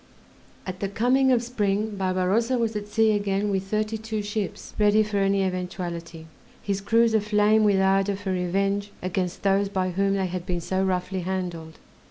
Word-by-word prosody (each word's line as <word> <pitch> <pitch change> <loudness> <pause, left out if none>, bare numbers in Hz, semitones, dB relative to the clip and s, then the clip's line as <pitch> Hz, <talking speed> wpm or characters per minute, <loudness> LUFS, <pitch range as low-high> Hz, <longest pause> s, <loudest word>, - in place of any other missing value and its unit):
At 185 0 -6
the 200 - -2
coming 255 +6 +2
of 240 -2 +3
spring 215 -3 -1
Barbarossa 195 +6 +1
was 225 -2 -1
at 205 0 -4
sea 220 +1 +3
again 205 0 0
with 190 -1 0
thirty 215 +2 -1
two 220 -1 -4
ships 205 -1 -4
ready 210 +1 +4
for 210 -1 -3
any 195 0 +2
eventuality, 175 -3 -4 0.3
his 200 -1 -2
crews 230 +2 +3
aflame 210 0 +3
with 200 -2 +3
ardor 195 +1 +2
for 195 -1 -4
revenge 195 +3 0
against 185 -1 -2
those 195 0 +2
by 185 -2 -1
whom 195 +2 +1
they 190 -1 0
had 180 -1 -4
been 175 -1 -1
so 190 +3 -1
roughly 185 0 -1
handled. 175 -3 -4
195 Hz, 175 wpm, -25 LUFS, 185-210 Hz, 0.3 s, ready